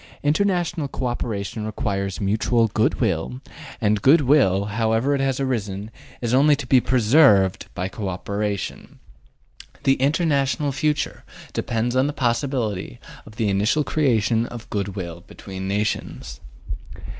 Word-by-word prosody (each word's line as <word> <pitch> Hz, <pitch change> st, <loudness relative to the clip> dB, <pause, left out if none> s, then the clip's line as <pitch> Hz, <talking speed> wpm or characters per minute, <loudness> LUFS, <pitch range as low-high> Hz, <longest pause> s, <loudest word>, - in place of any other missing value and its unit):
International 175 Hz, 0 st, +1 dB
co 130 Hz, -1 st, -4 dB
operation 110 Hz, -3 st, -3 dB
requires 100 Hz, -3 st, -3 dB
mutual 110 Hz, +3 st, +2 dB
good 110 Hz, +1 st, +1 dB
will, 65 Hz, +1 st, -1 dB, 0.4 s
and 105 Hz, -1 st, +1 dB
good 150 Hz, +7 st, +6 dB
will, 125 Hz, -9 st, +3 dB
however 110 Hz, +5 st, +1 dB
it 140 Hz, -, 0 dB
has 135 Hz, -1 st, 0 dB
arisen, 105 Hz, -6 st, -2 dB, 0.3 s
is 120 Hz, -1 st, -1 dB
only 145 Hz, +3 st, +5 dB
to 140 Hz, -1 st, -6 dB
be 125 Hz, 0 st, +4 dB
PRESERVED 115 Hz, -, +4 dB
by 90 Hz, +1 st, -2 dB
co 100 Hz, 0 st, -5 dB
operation. 100 Hz, +2 st, -4 dB, 0.9 s
The 135 Hz, 0 st, +3 dB
international 145 Hz, -1 st, +1 dB
future 150 Hz, +2 st, -1 dB, 0.3 s
depends 115 Hz, +1 st, -1 dB
upon 130 Hz, +2 st, +2 dB
the 145 Hz, -, -3 dB
possibility 120 Hz, -, -1 dB, 0.3 s
of 110 Hz, -, -13 dB
the 110 Hz, -1 st, 0 dB
initial 105 Hz, +10 st, +2 dB
creation 120 Hz, -6 st, +1 dB
of 120 Hz, -2 st, -9 dB
good 100 Hz, -2 st, -2 dB
will 85 Hz, -3 st, -6 dB
between 95 Hz, -1 st, -7 dB
nations. 100 Hz, -, -3 dB
115 Hz, 135 wpm, -23 LUFS, 100-135 Hz, 0.9 s, good